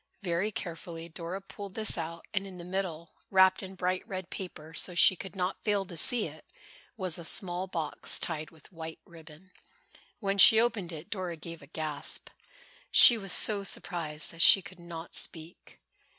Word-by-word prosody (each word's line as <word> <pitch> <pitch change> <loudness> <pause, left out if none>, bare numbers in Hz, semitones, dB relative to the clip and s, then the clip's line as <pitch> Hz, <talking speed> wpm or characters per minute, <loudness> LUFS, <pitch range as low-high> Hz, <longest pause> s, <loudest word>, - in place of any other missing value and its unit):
Very 185 +4 -1
carefully, 170 -2 -7
Dora 170 +3 -6
pulled 195 0 -10
this 220 -1 +1
out 165 0 -6
and 195 -1 -2
in 185 -2 -11
the 170 - -9
middle, 180 -3 -5 0.2
wrapped 190 -1 +4
in 190 -1 -9
bright 185 0 -1
red 185 -3 -7
paper 160 -4 -8
so 175 +2 +1
she 185 - +6
could 190 +3 -9
not 185 0 -3
fail 205 -2 0
to 175 - -10
see 235 +7 +2
it, - - -10 0.5
was 185 -5 -2
a - - -8
small 180 +2 -2
box, 165 -5 -1
tied 155 -2 -3
with 160 0 -21
white 160 -2 -8
ribbon. 165 +2 -16 0.7
When 195 -2 -2
she 220 +3 +9
opened 225 -7 0
it 165 +5 -9
Dora 185 -5 -4
gave 165 +1 -9
a 140 - -14
gasp. 155 -1 -4 0.6
She 240 - +10
was 195 -4 -2
so 205 -2 +2
surprised 160 -6 -1
that 165 - -5
she 195 - +8
could 190 -2 -13
not 170 -1 -9
speak. 165 +1 -2
180 Hz, 180 wpm, -29 LUFS, 165-195 Hz, 0.7 s, She